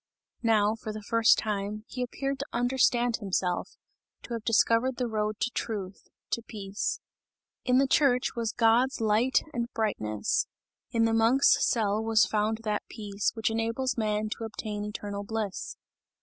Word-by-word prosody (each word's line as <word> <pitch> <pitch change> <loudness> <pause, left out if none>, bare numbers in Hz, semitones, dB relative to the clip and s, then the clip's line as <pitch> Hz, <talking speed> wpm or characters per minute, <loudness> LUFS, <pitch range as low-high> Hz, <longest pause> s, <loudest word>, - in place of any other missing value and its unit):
Now, 215 -3 +3
for 220 -1 -6
the 215 0 -7
first 230 +1 +4
time, 210 0 -3
he 255 - -6
appeared 275 +2 -3
to 280 - -3
understand 245 -1 +2
himself, 185 -3 -2 0.5
to 240 - -7
have 230 -2 -4
discovered 230 +3 +3
the 250 - 0
road 215 -1 -2
to 240 - +1
truth, 200 -6 -5 0.2
to 235 - 0
peace. 205 -3 -4 0.7
In 250 -1 +4
the 275 - +5
church 260 -2 +2
was 230 -2 -1
God's 235 +4 +3
light 225 +4 +2
and 235 0 -2
brightness, 110 - 0 0.4
in 230 -1 +2
the 225 - +1
monk's 230 +5 +5
cell 215 -2 +1
was 220 -3 +4
found 215 +2 0
that 210 -1 -1
peace, 205 -3 -2
which 225 0 0
enables 230 +3 -1
man 215 -1 0
to 225 - -5
obtain 210 -1 -5
eternal 205 -1 -5
bliss. 210 -2 -4
225 Hz, 155 wpm, -28 LUFS, 210-235 Hz, 0.7 s, the